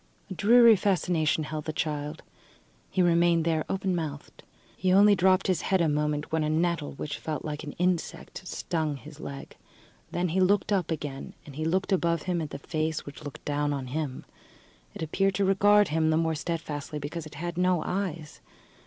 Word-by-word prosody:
A -, -, -1 dB
dreary 230 Hz, +5 st, +7 dB
fascination 175 Hz, -5 st, +1 dB
held 155 Hz, 0 st, -5 dB
the 155 Hz, -, -2 dB
child; 150 Hz, -1 st, -3 dB, 0.7 s
he 185 Hz, -, +2 dB
remained 170 Hz, -1 st, +3 dB
there 160 Hz, -2 st, +1 dB
open 190 Hz, -1 st, 0 dB
mouthed. 150 Hz, -4 st, -5 dB, 0.3 s
He 185 Hz, 0 st, 0 dB
only 205 Hz, +2 st, +7 dB
dropped 190 Hz, 0 st, +3 dB
his 185 Hz, -4 st, +1 dB
head 190 Hz, -, +1 dB
a 170 Hz, -, +3 dB
moment 150 Hz, 0 st, -1 dB
when 160 Hz, -1 st, +1 dB
a 150 Hz, -, 0 dB
nettle, 165 Hz, -1 st, 0 dB
which 150 Hz, +2 st, -5 dB
felt 155 Hz, 0 st, -4 dB
like 150 Hz, 0 st, -4 dB
an 145 Hz, -, -6 dB
insect, 180 Hz, -1 st, -2 dB
stung 155 Hz, -5 st, -2 dB
his 150 Hz, +2 st, -12 dB
leg; 140 Hz, -2 st, -8 dB, 0.6 s
then 180 Hz, 0 st, 0 dB
he 180 Hz, +4 st, 0 dB
looked 200 Hz, +2 st, +3 dB
up 185 Hz, -5 st, 0 dB
again 145 Hz, -4 st, -5 dB, 0.2 s
he 155 Hz, +3 st, -4 dB
looked 185 Hz, +5 st, 0 dB
above 170 Hz, -4 st, +1 dB
him 180 Hz, -2 st, -1 dB
at 155 Hz, -, -4 dB
the -, -, -6 dB
face 155 Hz, +2 st, -2 dB
which 145 Hz, +1 st, -10 dB
looked 145 Hz, -2 st, -9 dB
down 145 Hz, 0 st, 0 dB
on 135 Hz, -2 st, -3 dB
him. 150 Hz, -4 st, -3 dB, 0.7 s
It -, -, -4 dB
appeared 195 Hz, +5 st, +1 dB
to 200 Hz, +1 st, +2 dB
regard 205 Hz, +1 st, +5 dB
him 160 Hz, +1 st, +2 dB
the 160 Hz, -, +3 dB
more 165 Hz, 0 st, +1 dB
steadfastly 155 Hz, -2 st, -4 dB
because 150 Hz, +2 st, -5 dB
it 155 Hz, -, -13 dB
had 175 Hz, +3 st, -4 dB
no 180 Hz, -1 st, +2 dB
eyes. 175 Hz, -5 st, -4 dB
160 Hz, 190 wpm, -28 LUFS, 150-185 Hz, 0.7 s, dreary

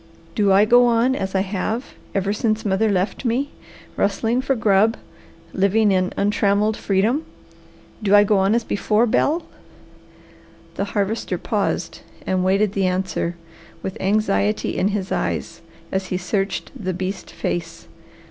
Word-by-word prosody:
"Do 200 Hz, +2 st, +2 dB
I 195 Hz, +2 st, +6 dB
go 245 Hz, +2 st, +6 dB
on 240 Hz, +2 st, +3 dB
as 190 Hz, -5 st, -3 dB
I 190 Hz, -, +3 dB
have 205 Hz, +5 st, -3 dB, 0.2 s
ever 195 Hz, +1 st, +1 dB
since 215 Hz, 0 st, -1 dB
mother 205 Hz, +2 st, +2 dB
left 190 Hz, +4 st, -1 dB
me, 255 Hz, +4 st, 0 dB, 0.4 s
rustling 225 Hz, +5 st, +1 dB
for 270 Hz, 0 st, 0 dB
grub, 220 Hz, 0 st, +3 dB, 0.6 s
living 200 Hz, +2 st, +3 dB
in 185 Hz, -1 st, +1 dB
untrammelled 205 Hz, +1 st, +2 dB
freedom? 215 Hz, +11 st, +1 dB, 0.8 s
Do 205 Hz, -1 st, +4 dB
I 205 Hz, -, +8 dB
go 205 Hz, -1 st, +2 dB
on 195 Hz, +3 st, +3 dB
as 235 Hz, -, +1 dB
before, 215 Hz, +2 st, +1 dB
Bel?" 300 Hz, +8 st, +1 dB, 1.3 s
The 200 Hz, -, -2 dB
Harvester 205 Hz, +3 st, -1 dB
paused -, -, -2 dB, 0.3 s
and 185 Hz, -1 st, 0 dB
waited 195 Hz, +2 st, +2 dB
the 195 Hz, -2 st, +1 dB
answer, 180 Hz, -2 st, -1 dB, 0.5 s
with 190 Hz, -, -4 dB
anxiety 190 Hz, -, +1 dB
in 190 Hz, -, +1 dB
his 200 Hz, -2 st, -2 dB
eyes -, -, -2 dB, 0.3 s
as 190 Hz, 0 st, -2 dB
he 185 Hz, -, -2 dB
searched 195 Hz, +2 st, -2 dB
the 185 Hz, -3 st, -3 dB
beast 185 Hz, +2 st, -4 dB
face. 165 Hz, -1 st, -4 dB
200 Hz, 145 wpm, -21 LUFS, 190-220 Hz, 1.3 s, I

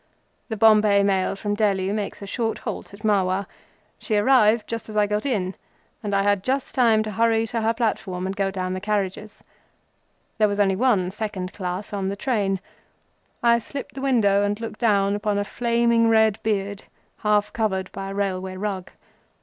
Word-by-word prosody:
The 220 Hz, -, -3 dB
Bombay 210 Hz, -2 st, +5 dB
Mail 195 Hz, -1 st, +1 dB
from 205 Hz, +1 st, -3 dB
Delhi 200 Hz, -3 st, +1 dB
makes 205 Hz, -1 st, -4 dB
a -, -, -5 dB
short 225 Hz, +2 st, -2 dB
halt -, -, -6 dB
at 200 Hz, +1 st, -14 dB
Marwar. 195 Hz, -2 st, +1 dB, 0.5 s
She 215 Hz, -, -1 dB
arrived 220 Hz, -1 st, +3 dB
as 220 Hz, -1 st, -5 dB
I 210 Hz, -, +4 dB
got 210 Hz, +5 st, -1 dB
in, 195 Hz, -8 st, -1 dB, 0.5 s
and 205 Hz, -2 st, -2 dB
I 195 Hz, -, +2 dB
had 205 Hz, -1 st, +2 dB
just 265 Hz, +3 st, -1 dB
time 225 Hz, -4 st, +4 dB
to 215 Hz, -, -5 dB
hurry 225 Hz, +1 st, +2 dB
to 230 Hz, 0 st, -3 dB
her 225 Hz, +1 st, +1 dB
platform 195 Hz, -6 st, -2 dB
and 190 Hz, +1 st, -3 dB
go 195 Hz, -1 st, 0 dB
down 185 Hz, -1 st, -3 dB
the 185 Hz, -, -3 dB
carriages. 210 Hz, 0 st, -3 dB, 1.0 s
There 215 Hz, -, +5 dB
was 200 Hz, 0 st, -2 dB
only 195 Hz, -2 st, +3 dB
one 200 Hz, -5 st, +2 dB
second 205 Hz, -3 st, -4 dB
class 185 Hz, +2 st, -5 dB
on 195 Hz, -1 st, -1 dB
the 200 Hz, -, -3 dB
train. 200 Hz, -4 st, 0 dB, 0.8 s
I 235 Hz, 0 st, +5 dB
slipped 275 Hz, +4 st, -7 dB
the 270 Hz, -, -7 dB
window 220 Hz, -7 st, +3 dB
and 205 Hz, +1 st, 0 dB
looked 225 Hz, -1 st, -6 dB
down 200 Hz, -3 st, +2 dB
upon 205 Hz, 0 st, -1 dB
a 205 Hz, -, +1 dB
flaming 235 Hz, 0 st, +2 dB
red 220 Hz, -2 st, +3 dB
beard, 205 Hz, -2 st, -2 dB, 0.3 s
half 210 Hz, -1 st, +1 dB
covered 190 Hz, -4 st, -1 dB
by 195 Hz, 0 st, -6 dB
a -, -, -5 dB
railway 190 Hz, -2 st, -2 dB
rug. 190 Hz, -2 st, -4 dB
205 Hz, 180 wpm, -23 LUFS, 195-225 Hz, 1.0 s, Bombay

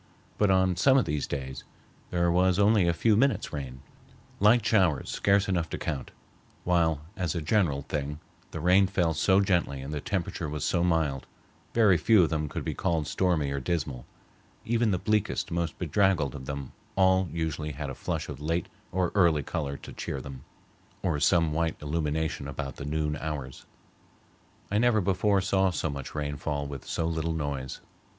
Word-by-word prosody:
But 105 Hz, -, +4 dB
on 95 Hz, -1 st, +3 dB
some 135 Hz, +8 st, +5 dB
of 130 Hz, -, +3 dB
these 75 Hz, -1 st, -2 dB
days 65 Hz, -2 st, -5 dB, 0.5 s
there 85 Hz, -1 st, +1 dB
was 90 Hz, +1 st, +3 dB
only 100 Hz, -2 st, +4 dB
a -, -, +4 dB
few 105 Hz, +6 st, +2 dB
minutes' 135 Hz, +5 st, +1 dB
rain, 65 Hz, -2 st, -6 dB, 0.6 s
light 110 Hz, +4 st, +5 dB
showers 90 Hz, -10 st, +2 dB
scarce 100 Hz, 0 st, +2 dB
enough 85 Hz, -4 st, 0 dB
to -, -, -4 dB
count, 70 Hz, -4 st, -4 dB, 0.5 s
while 85 Hz, -4 st, +2 dB
as 90 Hz, -5 st, -2 dB
a -, -, 0 dB
general 75 Hz, -4 st, +1 dB
thing 75 Hz, 0 st, -4 dB, 0.3 s
the 80 Hz, -, -6 dB
rain 90 Hz, +4 st, +4 dB
fell 90 Hz, -4 st, +1 dB
so 95 Hz, +6 st, +3 dB
gently 90 Hz, -8 st, +1 dB
and 70 Hz, +3 st, -6 dB
the 75 Hz, -, -3 dB
temperature 85 Hz, -4 st, -3 dB
was 75 Hz, -1 st, -4 dB
so 85 Hz, +1 st, +1 dB
mild, 80 Hz, -6 st, 0 dB, 0.5 s
very 105 Hz, -6 st, +5 dB
few 100 Hz, +3 st, +5 dB
of 80 Hz, -, 0 dB
them 75 Hz, -2 st, -1 dB
could -, -, -5 dB
be -, -, -2 dB
called 80 Hz, -3 st, 0 dB
stormy 80 Hz, -2 st, 0 dB
or 70 Hz, -, -1 dB
dismal; 70 Hz, -5 st, -3 dB, 0.6 s
even 115 Hz, 0 st, +2 dB
the 95 Hz, -, +1 dB
bleakest, 105 Hz, +2 st, 0 dB
most 85 Hz, -1 st, -2 dB
bedraggled 90 Hz, -5 st, +1 dB
of 65 Hz, -2 st, -8 dB
them 70 Hz, -2 st, -5 dB, 0.2 s
all 95 Hz, -1 st, +4 dB
usually 80 Hz, -2 st, -3 dB
had 70 Hz, -1 st, -5 dB
a -, -, -5 dB
flush -, -, -3 dB
of -, -, -7 dB
late 85 Hz, +3 st, -1 dB, 0.2 s
or 90 Hz, -1 st, 0 dB
early 85 Hz, -7 st, +3 dB
color 70 Hz, -1 st, -3 dB
to -, -, -11 dB
cheer 70 Hz, -, -4 dB
them, 65 Hz, 0 st, -9 dB, 0.6 s
or 80 Hz, -5 st, 0 dB
some 85 Hz, 0 st, +3 dB
white 80 Hz, 0 st, -1 dB
illumination 75 Hz, -1 st, -2 dB
about 70 Hz, 0 st, -5 dB
the -, -, -6 dB
noon 75 Hz, 0 st, -1 dB
hours. 70 Hz, -4 st, -6 dB, 1.0 s
I 105 Hz, -, +2 dB
never 120 Hz, -2 st, +4 dB
before 100 Hz, +1 st, +2 dB
saw 95 Hz, 0 st, +2 dB
so 80 Hz, -3 st, -2 dB
much 70 Hz, 0 st, -7 dB
rain 75 Hz, -1 st, -2 dB
fall 70 Hz, 0 st, -2 dB
with 70 Hz, -2 st, -7 dB
so 80 Hz, -, -1 dB
little 80 Hz, 0 st, -1 dB
noise. 70 Hz, -4 st, -4 dB
80 Hz, 180 wpm, -28 LUFS, 75-95 Hz, 1.0 s, some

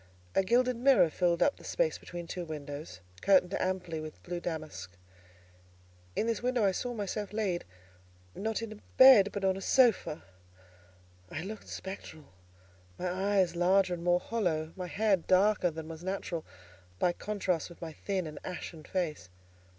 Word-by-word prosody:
A -, -, +4 dB
gilded 245 Hz, +4 st, +2 dB
mirror 240 Hz, -, +5 dB
filled 175 Hz, 0 st, +2 dB
up 285 Hz, -, +2 dB
the -, -, -15 dB
space -, -, 0 dB
between 175 Hz, -1 st, -7 dB
two 175 Hz, +1 st, -5 dB
windows, 145 Hz, -, -7 dB, 0.2 s
curtained 190 Hz, -1 st, +4 dB
amply 180 Hz, -3 st, -2 dB
with 155 Hz, 0 st, -9 dB
blue 175 Hz, 0 st, -4 dB
damask. 155 Hz, -, -5 dB, 1.2 s
In -, -, +1 dB
this 230 Hz, -1 st, -1 dB
mirror 245 Hz, -3 st, +1 dB
I 195 Hz, -, +4 dB
saw 245 Hz, +6 st, -3 dB
myself 205 Hz, -1 st, -3 dB
laid, 205 Hz, -5 st, -1 dB, 0.7 s
not 220 Hz, +2 st, -2 dB
in 215 Hz, -2 st, -7 dB, 0.2 s
bed, 255 Hz, -7 st, +9 dB
but 200 Hz, -1 st, -3 dB
on 190 Hz, -1 st, +3 dB
a 195 Hz, -, -6 dB
sofa. 230 Hz, -10 st, +3 dB, 1.1 s
I 160 Hz, -, -5 dB
looked 210 Hz, +3 st, -7 dB
spectral; 190 Hz, -5 st, -8 dB, 0.7 s
my 180 Hz, -, -2 dB
eyes 190 Hz, -1 st, +1 dB
larger 185 Hz, +1 st, +3 dB
and 170 Hz, -1 st, -5 dB
more 175 Hz, 0 st, +3 dB
hollow, 175 Hz, -7 st, -1 dB
my 180 Hz, -2 st, -5 dB
hair 205 Hz, +2 st, +2 dB
darker 185 Hz, +2 st, +3 dB
than 160 Hz, -1 st, -7 dB
was 165 Hz, +1 st, -8 dB
natural, 185 Hz, -3 st, -3 dB, 0.5 s
by 175 Hz, -, +2 dB
contrast 190 Hz, -5 st, -2 dB
with 170 Hz, -, -14 dB
my 165 Hz, -2 st, -6 dB
thin 190 Hz, +2 st, -2 dB
and 150 Hz, -1 st, -7 dB
ashen 175 Hz, -3 st, -6 dB
face. 155 Hz, -, -3 dB
185 Hz, 160 wpm, -31 LUFS, 170-210 Hz, 1.2 s, bed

